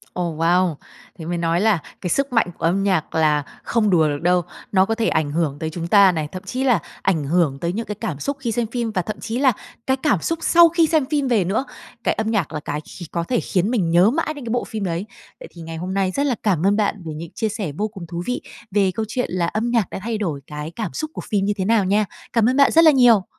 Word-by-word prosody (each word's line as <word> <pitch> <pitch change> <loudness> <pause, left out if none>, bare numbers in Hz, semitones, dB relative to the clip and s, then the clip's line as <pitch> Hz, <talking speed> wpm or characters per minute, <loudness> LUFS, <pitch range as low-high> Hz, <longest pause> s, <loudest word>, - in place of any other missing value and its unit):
Ồ, 170 -3 -2
wow! 170 +1 +2 0.4
Thế 160 - -7
mới 175 +1 -2
nói 170 +2 +1
là 215 -5 +3 0.2
cái 180 - -3
sức 275 +3 0
mạnh 230 - +3
của - - -2
âm 190 +4 +2
nhạc 185 -7 0
là 150 -2 +3 0.2
không 225 -3 +1
đùa 165 -5 +4
được 145 0 -2
đâu. 180 +1 +3 0.3
Nó 190 -1 +4
có 225 - -1
thể 225 0 0
ảnh 155 -2 0
hưởng 150 -2 -1
tới 160 - -2
chúng 165 +1 -5
ta 200 -1 +6
này, 155 -3 -2
thậm 185 - -7
chí 255 +1 -3
là 245 -7 +3 0.2
ảnh 165 -6 +1
hưởng 150 -3 +1
tới 170 +1 -2
những 230 +2 -3
cái 210 - -5
cảm 165 -8 -4
xúc 280 - -3
khi 240 -4 -2
xem 230 +1 -1
phim 235 0 -2
và 185 - 0
thậm 210 +4 -6
chí 230 +2 -4
là 265 -2 +5 0.4
cái 265 0 +2
cảm 255 - +1
xúc 330 0 -1
sau 340 0 +6
khi 330 -1 +3
xem 310 -4 +2
phim 285 -1 0
về 230 -6 +3
nữa, 200 +9 -1 0.4
cái - - +2
âm 220 0 -2
nhạc 195 -8 -1
là 155 - -2
cái 145 0 -4
khí 175 +3 -10
có 170 -1 -1
thể 240 +6 0
khiến 190 +1 0
mình 185 -9 +1
nhớ 175 +5 +5
mãi 310 +3 -1
đến 285 -4 -9
cái 230 - -3
bộ 245 +1 0
phim 215 -3 -5
đấy. 175 +1 -2 0.3
Vậy - - -9
thì 170 - -12
ngày 165 0 -7
hôm 180 +3 -4
nay 190 -1 +1
rất 280 +8 0
là 260 -4 +1
cảm 185 -5 +1
ơn 200 - +3
bạn 205 -2 -1
về 160 - -5
những 160 +2 -7
chia 220 -2 -1
sẻ 205 -8 -4
vô 210 +1 0
cùng 195 -5 -10
thú 170 +1 -5
vị 250 - -2 0.3
về 195 -2 +2
câu 220 - -1
chuyện 250 +4 -2
là 175 -1 0
âm 220 +5 -1
nhạc 230 -5 +1
đã - - -5
thay 225 +2 -2
đổi 165 -10 -3
cái 150 +2 -6
cảm 215 -7 -4
xúc 310 0 -4
của - - -5
phim 200 -2 +1
như 205 - +1
thế 190 - -1
nào 215 -2 +3
nha. 210 +3 +2 0.3
Cảm 230 0 +4
ơn 260 - 0
bạn 280 - +5
rất 330 +1 +6
là 315 - +9
nhiều! 240 -8 +5
195 Hz, 285 wpm, -21 LUFS, 170-235 Hz, 0.4 s, là